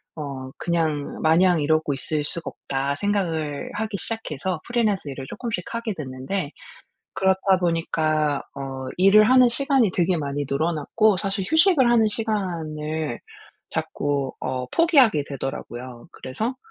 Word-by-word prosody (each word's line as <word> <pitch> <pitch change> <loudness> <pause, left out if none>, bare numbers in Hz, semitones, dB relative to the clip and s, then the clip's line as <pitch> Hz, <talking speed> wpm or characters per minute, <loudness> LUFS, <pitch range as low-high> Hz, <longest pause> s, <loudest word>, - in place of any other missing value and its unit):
어 135 -4 -6
그냥 160 -4 -1
'마냥 170 +1 +4
이러고 155 0 +1
있을 150 +2 -2
수가 165 +2 0
없다.' 140 +1 -3
생각을 165 -8 -1
하기 215 -1 -3
시작해서 185 -6 -4
프리랜서 215 -9 0
일을 135 0 -7
쪼끔씩 230 -7 -4
하게 230 -2 -2
됐는데 140 +4 -4 0.6
그렇다 190 0 +2
보니까 155 -4 0
어 135 -1 -5
일을 210 +4 +6
하는 255 -1 +7
시간이 270 -3 +2
되게 180 0 +2
많이 145 -2 -2
늘어났고 165 +8 +2
사실 195 0 -2
휴식을 320 -6 +5
하는 225 -2 +4
시간을 160 - -3 0.5
자꾸 140 -2 -2
어 130 -1 -3
포기하게 265 - +4
되더라고요. 125 -2 -6
그래서 220 - -4
165 Hz, 300 characters per minute, -23 LUFS, 145-210 Hz, 0.6 s, 하는